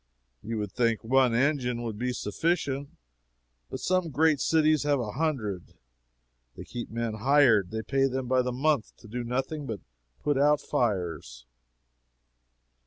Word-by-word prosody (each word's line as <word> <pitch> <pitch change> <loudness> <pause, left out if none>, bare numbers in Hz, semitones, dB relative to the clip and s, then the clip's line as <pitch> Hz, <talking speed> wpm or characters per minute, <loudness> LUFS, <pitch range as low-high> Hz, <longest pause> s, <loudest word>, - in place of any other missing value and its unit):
You 115 +1 -4
would 105 -2 -3
think 115 0 0
one 125 0 +3
engine 125 -2 +1
would 110 -3 -5
be 125 +1 -1
sufficient, 140 - -1 0.8
but - - -5
some 185 -2 0
great 155 +1 +3
cities 155 -1 +3
have 145 -1 +1
a 110 -4 -3
hundred; 120 - -3 0.8
they - - -7
keep 120 -1 -7
men 115 0 -3
hired, 115 -4 +4
and 110 -1 -5
pay 135 0 +2
them 130 -1 -3
by 130 0 +3
the 125 0 -2
month 140 -1 0
to 115 - -15
do 120 +3 -4
nothing 135 +5 -3
but 110 -3 -4 0.4
put 145 -2 +1
out 150 +1 +4
fires. 85 - -2
125 Hz, 150 wpm, -28 LUFS, 110-145 Hz, 0.8 s, hired